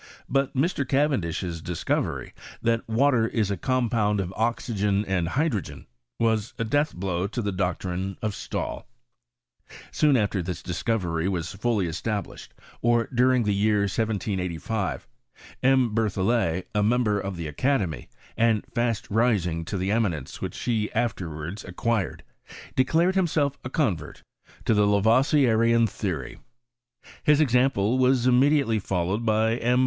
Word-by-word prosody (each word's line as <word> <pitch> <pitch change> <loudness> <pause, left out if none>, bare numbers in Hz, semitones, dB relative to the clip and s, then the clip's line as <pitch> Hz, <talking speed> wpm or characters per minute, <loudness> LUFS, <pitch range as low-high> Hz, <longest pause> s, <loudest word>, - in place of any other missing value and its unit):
Bui 135 +1 +2
Mr. 145 +2 +1
CaveadUJiRdlscoveiT. 90 - -1 0.3
thatwaierisacompound 115 -2 +1
of 95 -1 -3
oxygen 105 -3 0
and 90 -3 0
hydrogen, 130 - -2 0.3
wa£ 110 -1 +1
a - - -1
dealh 145 +7 +1
biow 90 0 -2
to 120 - -4
tha 105 -3 -1
tloctrine 95 0 -2
of 110 - -1
Slahl - - -4 1.1
Soon 150 -3 +3
afler 105 -5 +1
this 90 0 -5
discovery 90 -3 -1
wax 90 -2 -3
I'uUv 105 -1 0
established, 100 +6 -4 0.3
or 120 0 +2
during 125 0 +3
the 105 -1 +1
year 105 +1 +2
17S5, 100 -1 -2 0.6
M. 130 -3 +3
Ber 110 -1 +2
thoflet, 95 -3 0
a. 105 - +2
member 105 -1 +2
of 95 -2 -5
the 85 -2 -4
academy, 95 - -1 0.3
and 115 -2 +2
tast 120 -3 -1
ming 100 -8 +1
to 100 - -3
tlie 95 +2 0
eminence 95 - -2
which - - -4
he 110 -3 -1
afterwards 85 -5 -3
acquired, 100 +3 -2 0.5
de 130 - +4
clared 170 +6 +2
himself 155 -7 +1
a 130 - -5
convert 105 - -2 0.4
to - - +3
the 105 -1 +3
Laroi^ieaian 115 +2 +4
theory. 90 - -4 0.8
His 150 -1 +4
example 125 -4 +2
was 130 -1 +3
irotnediaiely 130 -3 +3
followed 95 +3 -1
by 110 +1 +2
M. 125 +1 +2
110 Hz, 125 wpm, -25 LUFS, 95-125 Hz, 1.1 s, de